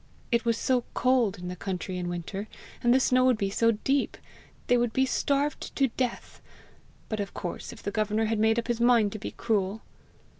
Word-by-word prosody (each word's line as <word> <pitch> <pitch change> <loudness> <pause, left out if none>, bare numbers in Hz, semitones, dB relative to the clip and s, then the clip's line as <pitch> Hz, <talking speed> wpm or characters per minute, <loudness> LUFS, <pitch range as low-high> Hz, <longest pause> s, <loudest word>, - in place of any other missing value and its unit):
It 235 0 +2
was 230 -1 +2
so 250 0 +1
cold 245 -5 +2
in 180 0 -7
the 180 - -4
country 185 0 -4
in 175 -1 -3
winter, 175 +4 -5 0.3
and 240 - +3
the 260 - +6
snow 255 -1 +3
would 255 -3 +4
be 195 -2 -1
so 230 +3 +3
deep! 270 +6 0 0.5
they 245 - +3
would 240 -2 +1
be 265 - +3
starved 280 +2 -1
to 270 -2 +3
death! 245 +1 -4 0.7
But, 215 - -3
of 200 -1 -4
course 175 - -5
if - - -12
the 205 - -2
governor 215 +1 0
had 220 0 0
made 220 +1 +3
up 235 - -1
his 235 -1 -1
mind 235 -4 +4
to 215 - -6
be - - -5
cruel! 215 -2 -1
225 Hz, 210 wpm, -28 LUFS, 200-245 Hz, 0.7 s, the